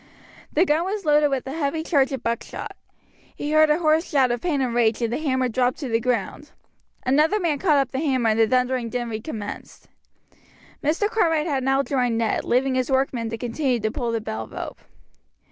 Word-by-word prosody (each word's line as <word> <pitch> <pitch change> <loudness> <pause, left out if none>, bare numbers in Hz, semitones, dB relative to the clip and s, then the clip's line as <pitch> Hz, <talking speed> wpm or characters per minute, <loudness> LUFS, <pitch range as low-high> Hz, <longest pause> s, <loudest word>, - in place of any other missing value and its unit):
The 335 +5 +3
gun 310 0 +2
was 390 +1 -3
loaded 300 0 +4
with 270 -2 -2
a 265 - -5
heavy 315 +1 -2
charge 280 -5 +2
of 265 -3 -4
buckshot. 230 0 -4 0.6
He 290 - -4
heard 310 0 +5
a 300 - +4
hoarse 320 0 +2
shout 265 -4 +3
of 240 - -2
pain 325 -6 0
and 255 -3 -1
rage, 230 -2 +2
and 235 -1 -1
the - - -1
hammer 260 -4 0
dropped 250 +1 0
to 270 - -3
the 225 0 +2
ground. 250 +5 -2 0.6
Another 305 +10 +3
man 320 -6 0
caught 305 -4 +3
up 275 -2 +1
the 265 - -2
hammer 260 -6 +1
and 215 - 0
the 225 - +5
thundering 250 0 0
din 240 -1 -3
recommenced. 220 -1 -7 0.9
Mr. 325 +8 +1
Cartwright 330 -8 +1
had 275 -5 -1
now 270 +1 +2
joined 250 -5 0
Ned, 225 -1 0
leaving 260 +2 +1
his 255 -1 0
workmen 260 -4 0
to 230 - -4
continue 245 +1 -1
to 220 0 -1
pull 240 -2 -2
the 230 - -1
bell 110 - -5
rope. - - -7
265 Hz, 205 wpm, -23 LUFS, 240-300 Hz, 0.9 s, heard